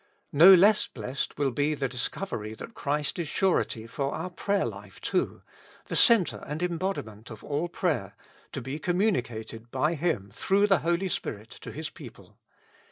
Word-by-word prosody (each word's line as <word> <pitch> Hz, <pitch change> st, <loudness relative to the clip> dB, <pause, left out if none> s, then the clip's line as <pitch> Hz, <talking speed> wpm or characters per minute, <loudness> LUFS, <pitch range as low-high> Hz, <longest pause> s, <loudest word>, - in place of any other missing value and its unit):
No 165 Hz, +7 st, +9 dB
less 205 Hz, +4 st, +5 dB
blessed 125 Hz, +4 st, -4 dB
will 140 Hz, -2 st, +1 dB
be 145 Hz, +5 st, 0 dB
the 140 Hz, -2 st, -1 dB
discovery 120 Hz, -, -3 dB
that 230 Hz, -, -9 dB
Christ 150 Hz, +1 st, -2 dB
is 170 Hz, -, -2 dB
surety 160 Hz, -, 0 dB
for 135 Hz, +4 st, -3 dB
our 170 Hz, +3 st, -4 dB
prayer 200 Hz, +2 st, 0 dB
life -, -, -8 dB
too, -, -, -1 dB, 0.5 s
the -, -, -2 dB
center 225 Hz, -, +4 dB
and 150 Hz, +4 st, -3 dB
em 175 Hz, -2 st, -1 dB
bodiment 115 Hz, -, -4 dB
of 110 Hz, -2 st, -10 dB
all 150 Hz, +4 st, -1 dB
prayer, 160 Hz, -, -1 dB, 0.4 s
to -, -, -4 dB
be 130 Hz, +5 st, -5 dB
communicated 120 Hz, -, -1 dB
by 150 Hz, +6 st, +1 dB
Him 150 Hz, -, -1 dB
through 195 Hz, -, +2 dB
the 195 Hz, -3 st, +4 dB
Holy 170 Hz, +4 st, 0 dB
Spirit 110 Hz, -, -4 dB
to -, -, -9 dB
His -, -, -5 dB
people. -, -, -13 dB
150 Hz, 165 wpm, -28 LUFS, 120-180 Hz, 0.5 s, No